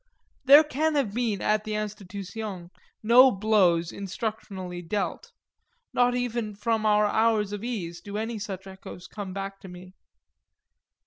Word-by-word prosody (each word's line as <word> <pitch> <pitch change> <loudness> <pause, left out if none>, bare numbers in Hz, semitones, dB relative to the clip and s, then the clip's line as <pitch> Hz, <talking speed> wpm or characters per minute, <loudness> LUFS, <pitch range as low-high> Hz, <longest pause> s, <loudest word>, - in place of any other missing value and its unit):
There 285 +3 +9
can 305 +1 -1
have 255 -8 0
been 225 -4 -1
at 215 0 +1
the 215 0 -4
Institution 200 -2 -6 0.3
no 245 +4 +7
blows 190 -6 +2
instructionally 195 -3 -5
dealt 200 +4 -3 0.6
nor 245 0 +3
even 235 -4 -2
from 220 +1 0
our 210 0 +4
hours 220 -1 +2
of 205 0 -5
ease 175 -8 -4
do 205 +2 -6
any 220 +1 -3
such 195 -2 -6
echoes 190 -1 -10
come 200 0 -7
back 195 +1 -6
to - - -12
me. 180 +1 -12
210 Hz, 140 wpm, -26 LUFS, 190-225 Hz, 0.6 s, There